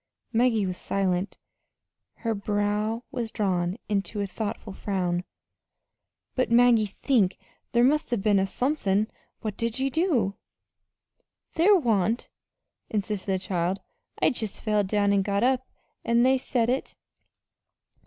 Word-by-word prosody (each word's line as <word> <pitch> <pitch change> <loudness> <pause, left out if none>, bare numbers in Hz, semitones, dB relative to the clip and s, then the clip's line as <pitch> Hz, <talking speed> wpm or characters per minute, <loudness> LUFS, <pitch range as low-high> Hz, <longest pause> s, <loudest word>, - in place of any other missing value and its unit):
Maggie 225 -3 +3
was 185 -1 -3
silent. 190 0 -1 0.9
Her 225 - +2
brow 210 +2 -1
was 240 -4 -3
drawn 185 -3 -1
into 205 0 -1
a 200 - 0
thoughtful 205 +1 -5
frown. 180 -3 -1 1.1
"But, 255 - 0
Maggie, 235 -2 +5
think 205 -2 +1 0.3
there 240 0 +4
must 300 +2 +2
'a' 240 - +2
been 200 -1 +3
somethin'. 215 -4 0 0.3
What 215 -2 -4
did 230 +1 -1
ye 270 +1 0
do?" 260 - +1 1.2
"There 370 +6 +5
wa'n't," 225 - +1 0.6
insisted 205 -2 -2
the 190 - +2
child. 185 0 -1 0.4
"I - - +4
jest 220 -4 -3
felled 210 -3 +1
down 205 0 +2
an' 200 - +3
got 200 +2 0
up, 260 0 +2 0.4
an' 235 +1 +3
they 260 +1 +4
said 240 -2 0
it." 255 +3 -1
215 Hz, 130 wpm, -26 LUFS, 195-245 Hz, 1.2 s, Maggie